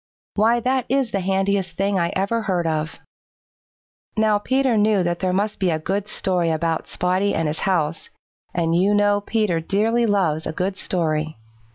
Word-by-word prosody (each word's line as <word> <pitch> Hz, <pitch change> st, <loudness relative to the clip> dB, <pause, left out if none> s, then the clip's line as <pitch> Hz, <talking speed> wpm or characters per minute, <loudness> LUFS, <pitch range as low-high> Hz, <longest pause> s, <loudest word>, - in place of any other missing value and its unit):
Why, 225 Hz, +3 st, +3 dB
that 255 Hz, +1 st, 0 dB
is 270 Hz, -2 st, +1 dB
the 200 Hz, -, 0 dB
handiest 190 Hz, -1 st, 0 dB
thing 195 Hz, 0 st, +1 dB
I 170 Hz, 0 st, 0 dB
ever 200 Hz, +5 st, 0 dB
heard 185 Hz, -5 st, -1 dB
of." 155 Hz, -1 st, -2 dB, 1.2 s
Now 215 Hz, -1 st, +3 dB
Peter 260 Hz, +2 st, +1 dB
knew 210 Hz, -2 st, +3 dB
that 175 Hz, 0 st, -1 dB
there 185 Hz, -1 st, 0 dB
must 205 Hz, +3 st, -1 dB
be 190 Hz, -2 st, +1 dB
a 160 Hz, -, +1 dB
good 195 Hz, +6 st, -2 dB
story 180 Hz, -5 st, 0 dB
about 160 Hz, 0 st, -1 dB
Spotty 185 Hz, +3 st, 0 dB
and 165 Hz, -1 st, 0 dB
his 150 Hz, +1 st, -2 dB
house, 165 Hz, -5 st, -1 dB, 0.4 s
and 165 Hz, -2 st, 0 dB
you 190 Hz, +4 st, +3 dB
know 205 Hz, 0 st, +3 dB
Peter 210 Hz, -5 st, 0 dB
dearly 225 Hz, +7 st, +1 dB
loves 170 Hz, -7 st, +1 dB
a -, -, -3 dB
good 190 Hz, +3 st, -2 dB
story. 155 Hz, -6 st, -2 dB
190 Hz, 175 wpm, -22 LUFS, 170-210 Hz, 1.2 s, Why